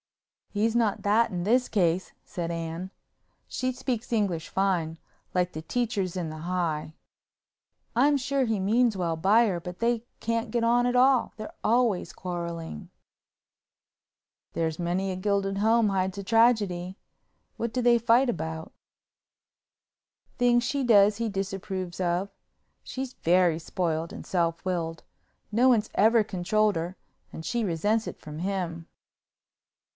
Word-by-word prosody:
"He's 220 +2 0
not 225 -4 +1
that 215 +3 +3
in 175 -2 -3
this 245 +6 +2
case," 180 -3 +1
said 170 -1 -4
Anne—she 170 +9 -6
speaks 245 -2 -4
English 195 -8 0
fine, 175 -5 0 0.4
like 180 0 0
the 155 - -5
teachers 200 -1 -2
in 170 -3 -2
the 155 0 -7 1.6
High—"I'm 285 +4 +4
sure 275 0 0
he 225 -4 0
means 220 +2 +2
well 170 -3 -1
by 205 +8 +4
her, 185 -5 -1
but 180 +1 -7
they 235 -1 +1 0.2
can't 230 0 -2
get 235 0 0
on 240 +1 +3
at 245 - 0
all, 255 0 +4
they're 215 -1 -7
always 230 -4 +2
quarreling." 170 - -5 1.6
"There's 160 -1 -2
many 180 +3 -1
a - - -3
gilded 195 0 0
home 220 +1 +3
hides 190 0 -1
a 200 - -4
tragedy. 205 -5 +2 0.6
What 235 -1 -3
do 250 - -1
they 240 -1 +5
fight 235 +3 +4
about?" 160 -5 -4 1.6
"Things 240 -1 +3
she 275 +3 -1
does 205 -3 +5
he 230 -1 -1
disapproves 190 -2 -4
of. 180 +2 0 0.5
She's 260 0 -5
very 175 -1 +2
spoiled 165 -1 -2
and - - -9
self 170 -2 -1
willed. 165 -3 -2 0.5
No 240 +5 +4
one's 220 -4 +2
ever 220 +2 +4
controlled 210 +3 +1
her 170 +3 -4 0.3
and 160 - -8
she 240 +4 -1
resents 205 +5 0
it - - -7
from 150 0 -8
him." 175 -3 -3
195 Hz, 140 wpm, -27 LUFS, 175-230 Hz, 1.6 s, they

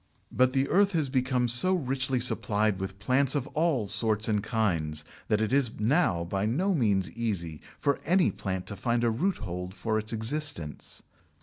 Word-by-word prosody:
But 130 0 +2
the 135 0 +1
earth 200 +1 +3
has 155 -5 0
become 130 -2 +1
so 125 +11 +3
richly 135 -4 -1
supplied 105 -4 +1
with 95 0 -5
plants 130 +6 +2
of 140 -3 0
all 155 -8 0
sorts 110 +1 +2
and 105 -2 +1
kinds 85 -9 -1 0.2
that 105 0 +1
it 110 +3 -1
is 135 -7 +1
now 110 - +2
by 95 +4 -2
no 180 - +1
means 105 - +1
easy 95 -9 -3 0.2
for 140 -1 0
any 180 +1 +3
plant 95 -2 -4
to 100 - -3
find 120 +2 -1
a 115 - +2
roothold 100 - -3
for 110 0 -1
its 110 0 -3
existence. 115 - 0
115 Hz, 175 wpm, -28 LUFS, 100-135 Hz, 0.2 s, earth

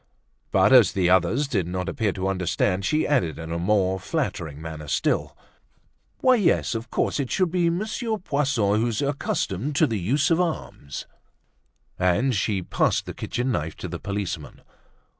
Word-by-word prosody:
But, - - +4
as 120 -7 +7
the 90 -2 +2
others 95 - +3
did 100 - -1
not 90 +1 -3
appear 105 0 0
to 95 -1 -2
understand, 95 0 0
she 155 +10 +1
added 90 - +1
in 80 0 -7
a 85 - -2
more 95 0 +1
flattering 80 -4 -3
manner 80 -1 -7
still: - - 0 0.8
"Why, 255 -1 +5
yes, 200 - +2
of 115 +1 -5
course, - - 0
it 135 -3 -2
should 185 -3 +1
be 175 -2 +2
Monsieur 215 +5 -2
Poisson, 135 - +1
who's 120 +2 0
accustomed 140 -3 -2
to 155 - +5
the 115 -7 -2
use 140 - +1
of 165 +2 +4
arms." 155 - -4 0.9
And 90 +9 +2
she 100 -2 0
passed - - +1
the - - -6
kitchen 125 +2 -2
knife 80 -7 -2
to - - -6
the 85 0 -6
policeman. 100 -6 -5
105 Hz, 165 wpm, -24 LUFS, 90-140 Hz, 0.9 s, as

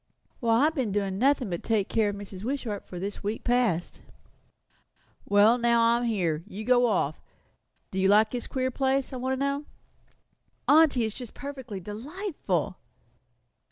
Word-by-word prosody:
"Why, 230 +3 +3
I've 315 - +2
been 260 -9 -1
doing 195 -1 -1
nothing 260 -4 +2
but 170 - -3
take 215 -4 0
care 220 -2 +1
of 205 - -4
Mrs. 200 -1 -9
Wishart 240 -5 -3
for 180 - -8
this 195 +3 -5
week 210 +2 -3
past." 240 -9 0 1.2
"Well, 210 +4 +5
now 235 0 +3
I'm 235 +1 +3
here. 175 -9 0
You 215 0 -7
go 245 +1 +4
off. 175 -8 0 0.7
Do 190 - -2
you 190 - +3
like 210 +2 +5
this 245 -1 -4
queer 260 -1 -1
place, 270 +1 0
I - - -3
want 260 +1 -1
to - - -2
know?" 280 +1 -1 1.0
"Aunty, 290 -5 +5
it - - +2
is 220 - -4
just 245 -4 -9
perfectly 265 -8 -7
delightful!" 285 - -3
230 Hz, 165 wpm, -27 LUFS, 205-260 Hz, 1.2 s, Well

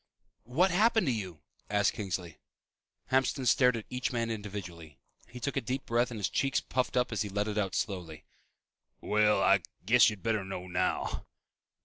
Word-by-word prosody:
"What 180 +9 +3
happened 220 +3 +3
to 130 - +1
you?" 95 -8 -5 0.3
asked 105 0 +2
Kingsley. 90 -6 -5 0.7
Hamston 130 0 +1
stared 125 -1 +4
at 110 - -7
each 125 +1 -2
man 115 -2 -1
individually. 95 -8 -7 0.3
He 125 - -10
took 140 +3 -3
a 135 - +1
deep 130 +3 -3
breath 120 +1 +1
and 115 -3 -6
his 100 - +1
cheeks 135 0 +1
puffed 130 -1 -2
up 125 0 +1
as 110 -4 -1
he 105 - -2
let 105 +2 -1
it 105 0 -1
out 95 -2 -1
slowly. 85 -7 -4 0.7
"Well, 105 0 +2
I - - +5 0.2
guess 120 +4 +6
you'd 105 -4 -8
better 110 -3 0
know 95 -1 -6
now." 90 -1 -2
110 Hz, 175 wpm, -30 LUFS, 95-125 Hz, 0.7 s, guess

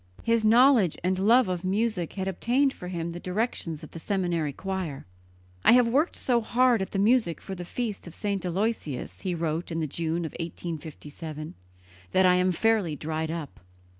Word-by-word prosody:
His 230 -1 +2
knowledge 230 - +5
and 185 +1 +1
love 230 +4 +5
of 180 -1 -2
music 195 -2 0
had 190 -1 -3
obtained 250 +9 +1
for 180 - -9
him 170 -2 -3
the 175 - -6
direction 185 -2 -2
of 155 0 -9
the 165 - -8
seminary 175 -5 -1
choir. 185 -3 -4 0.6
"I - - +7
have 245 -1 +6
worked 285 +9 +1
so 240 -2 +1
hard 240 0 +3
at 190 - -3
the - - -3
music 215 -4 +3
for 195 - -7
the 180 -1 -6
feast 215 -1 -4
of 170 - -10
St. 200 -2 -2
Aloysius," 180 - -2
he 185 -3 -2
wrote 165 +1 -2
in 165 - -2
the 160 - 0
June 165 +3 -2
of 160 - -5
1857, 160 -2 -6 0.6
"that 190 - +5
I 180 - +6
am 180 +1 +3
fairly 200 -3 +1
dried 160 +2 -3
up." 165 -3 -6
185 Hz, 185 wpm, -27 LUFS, 165-220 Hz, 0.6 s, I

